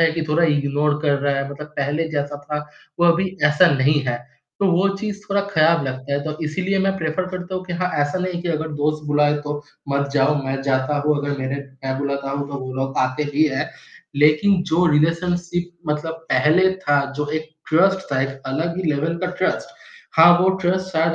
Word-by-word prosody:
है 165 -1 +5
कि 165 - -2
थोड़ा 165 +3 +3
इग्नोर 145 +1 0
कर 145 -2 +3
रहा 140 0 0
है, 140 0 -2
मतलब 145 +1 -8
पहले 150 +3 -1
जैसा 145 -1 -3
था, 150 0 -4 0.3
वो 175 - +5
अभी 185 +3 +2
ऐसा 150 +4 +5
नहीं 145 +2 +3
है, 120 - 0 0.4
तो 200 - +3
वो 180 +3 +3
चीज़ 205 -1 -4
थोड़ा 200 0 +2
खराब 165 -3 +3
लगता 130 +1 -5
है। 140 - +1
तो 155 -1 -4
इसीलिए 190 +5 -1
मैं 195 0 +1
प्रेफ़र 160 +2 -1
करता 185 0 -6
हूँ 185 0 -3
कि 180 - -6
हाँ, 180 +1 -1
ऐसा 145 +5 -1
नहीं 185 0 -2
है 175 - -3
कि 175 - -3
अगर 160 -1 -1
दोस्त 150 0 -1
बुलाए, 145 0 +3
तो 145 0 -5 0.3
मत 140 0 0
जाओ, 145 +1 +3
मैं 135 0 -2
जाता 135 +1 0
हूँ। 150 -1 +3
अगर 145 -1 -3
मेरे 130 +1 -2 0.3
मैं 130 0 -2
बुलाता 140 -1 -2
हूँ, 140 +1 -3
तो 140 - -7
वो 130 - -6
लोग 135 0 -2
आते 130 +3 +1
ही 155 - +4
हैं। 145 +3 -2 0.5
लेकिन 155 +6 +4
जो 175 +3 +3
रिलेशनशिप 175 +3 0 0.2
मतलब 150 +2 -2 0.2
पहले 180 +5 +4
था, 145 -6 +2 0.2
जो 150 - -1
एक 155 - -13 0.2
ट्रस्ट 190 +4 +4
था, 130 - +2
एक 135 0 -3
अलग 160 +6 -2
ही 185 - -2
लेवल 160 +4 -1
का - - +1
ट्रस्ट। 185 - 0 0.5
हाँ, 165 +2 +9
वो 185 - +4
ट्रस्ट 185 +1 0
शायद 165 0 +2
150 Hz, 215 wpm, -21 LUFS, 140-175 Hz, 0.5 s, हाँ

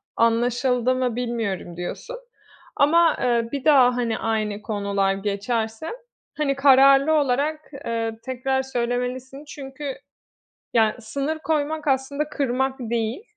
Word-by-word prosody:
"Anlaşıldı 245 +2 +2
mı 255 -3 -1
bilmiyorum." 225 -8 -3
diyorsun. 180 - -6 0.6
Ama, 330 +2 +4
eee, 235 -2 +1
bir 280 -2 -4
daha, 260 -5 +6
hani, 230 -3 -1
aynı 215 -2 -1
konular 200 -2 0
geçerse, 220 +6 -2 0.5
hani, 285 -2 0
kararlı 275 +2 +6
olarak, 295 +1 +1 0.2
eee, 225 -1 -2
tekrar 265 +1 -1
söylemelisin. 250 +2 -3
Çünkü, 275 -1 -7 0.8
ya, 220 -2 +3
sınır 280 +8 -3
koymak 310 -1 -1
aslında 280 +3 0
kırmak 265 -2 -1
değil. 235 - -2
250 Hz, 110 wpm, -23 LUFS, 230-280 Hz, 0.8 s, daha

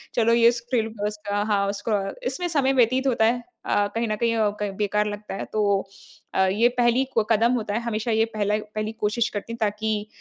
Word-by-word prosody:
चलो 230 -1 +3
ये 235 0 +6
स्क्रीन 235 -2 -2
उसका 205 -1 -3
हाँ, 200 -2 +1
उसको 205 0 -1 0.3
इसमें 350 +7 -2
समय 275 -5 +2
व्यतीत 260 +2 +3
होता 230 -3 +3
है। 240 +1 +1 0.2
अ, 205 0 +2
कहीं 230 0 0
न 215 - -1
कहीं 230 +1 0
अ, 215 -2 +2
क 205 - 0
बेकार 210 0 +1
लगता 205 -1 -6
है। - - -4
तो 200 -2 +1 0.4
अ, - - 0
ये 215 +5 +3
पहली 240 +2 +3
क 215 - +4
कदम 230 +2 +4
होता 215 -4 -2
है। 225 - 0
हमेशा 230 0 -2
ये 220 0 +3
पहला 210 0 +1 0.2
पहली 215 +1 -2
कोशिश 220 +3 +1
करती 215 +2 -5
हूँ - - -6
ताकि 215 0 -1
220 Hz, 210 wpm, -24 LUFS, 210-235 Hz, 0.4 s, ये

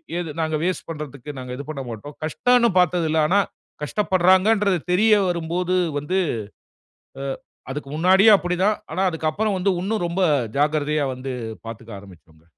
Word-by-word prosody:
இது 170 -4 -3
நாங்க 160 -1 0
வேஸ்ட் 185 +1 -2
பண்றதுக்கு 150 -3 -7
நாங்க 125 -1 -7
இது 140 - -7
பண்ணமாட்டோம். 135 -1 -7
கஷ்டன்னு 240 +9 +3
பாத்ததில்ல. 165 -3 +2
ஆனா, 195 +5 +3 0.4
கஷ்டப்படுறாங்கன்றது 190 +2 +3
தெரிய 215 +4 +4 0.2
வரும்போது 175 +2 -1 0.2
வந்து 180 +7 -2 1.0
அ - - -4 0.5
அதுக்கு 140 0 -5
முன்னாடியும் 190 +6 +6
அப்படி 180 -1 -2
தான். 210 +1 +3 0.2
ஆனா 190 - 0
அதுக்கப்பறம் 170 +6 -1
வந்து, 190 +2 +1
உன்னும் 205 +1 -1
ரொம்ப 180 +3 -2 0.4
ஜாக்கிரதையா 150 0 +1
வந்து, 130 +1 -6 0.3
பாத்துக்க 115 0 -9
ஆரம்பிச்சோங்க. 85 -5 -17
165 Hz, 135 wpm, -22 LUFS, 145-190 Hz, 1.0 s, முன்னாடியும்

